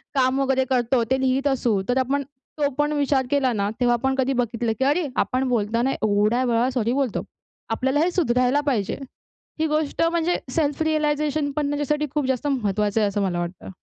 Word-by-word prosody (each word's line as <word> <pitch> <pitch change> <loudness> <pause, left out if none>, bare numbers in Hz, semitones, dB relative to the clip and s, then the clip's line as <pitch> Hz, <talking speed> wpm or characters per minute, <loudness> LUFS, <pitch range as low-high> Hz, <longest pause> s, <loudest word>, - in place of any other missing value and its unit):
काम 260 0 +2
वगैरे 265 -1 +1
करतो, 245 -1 +2
ते 265 - +3
लिहीत 265 +2 +1
असू 240 -7 +1
तर 245 - +2
आपण 275 +2 0
तो 285 +1 -4
पण 295 +1 +1
विचार 280 -2 +1
केला 270 -3 +2
ना, 200 -1 0
तेव्हा 240 -1 +3
आपण 265 +2 0
कधी 270 0 +1
बघितलं, 235 -2 -1
की 265 - +2
अरे 295 +2 +2
आपण 260 +1 0
बोलताना 235 +3 +1
एवढ्या 215 +3 +1
वेळा 240 +1 +2
सॉरी 240 -1 0
बोलतो. 270 -5 -1 0.5
आपल्याला 265 +5 +1
हे 345 +3 +2
सुधरायला 255 -4 +2
पाहिजे. 220 -6 0 0.6
ही 320 - +2
गोष्ट 305 +1 -1
म्हणजे 340 +1 +1
सेल्फ 295 0 0
रियलाईझेशन 300 -1 0
पण 285 0 -1
त्याच्यासाठी 295 +1 0
खूप 295 -2 0
जास्त 265 +2 -1
महत्त्वाचं 210 -5 0
आहे 205 - +3
असं 200 0 -1
मला 180 -3 -1
वाटतं. 175 +2 -6
265 Hz, 185 wpm, -23 LUFS, 235-290 Hz, 0.6 s, ते